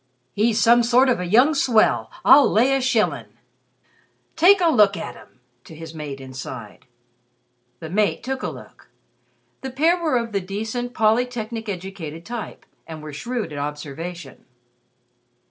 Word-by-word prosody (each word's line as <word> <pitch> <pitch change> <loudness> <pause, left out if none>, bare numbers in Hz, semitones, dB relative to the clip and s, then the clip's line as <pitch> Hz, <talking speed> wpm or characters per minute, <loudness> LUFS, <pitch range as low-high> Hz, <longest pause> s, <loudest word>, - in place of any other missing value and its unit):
"He's 220 +2 +1
some 235 +3 +5
sort 245 +3 +3
of 245 - +1
a 180 - -3
young 250 - +4
swell, 215 - +2 0.2
I'll 280 +1 +7
lay 245 +6 +3
a 270 - 0
shillin'! 245 -4 -1 1.0
Take 375 +5 +6
a 350 - +3
look 210 -9 +4
at - - -6
him," 130 - -18 0.3
to 160 - -12
his 160 0 -10
mate 150 -3 -7
inside. 130 -4 -9 0.9
The 160 - -7
mate 210 +2 0
took 265 +1 -4
a - - -2
look. - - -13 0.7
The 265 - -5
pair 325 +7 +1
were 310 -6 +1
of 230 -1 -3
the 200 -1 -1
decent, 220 +6 -5
polytechnic 225 0 0
educated 175 -4 -7
type, 235 -2 -7 0.2
and 155 -1 -9
were 155 -1 -8
shrewd 235 - -4
at 145 - -5
observation. 150 +1 -7
215 Hz, 150 wpm, -22 LUFS, 160-245 Hz, 1.0 s, I'll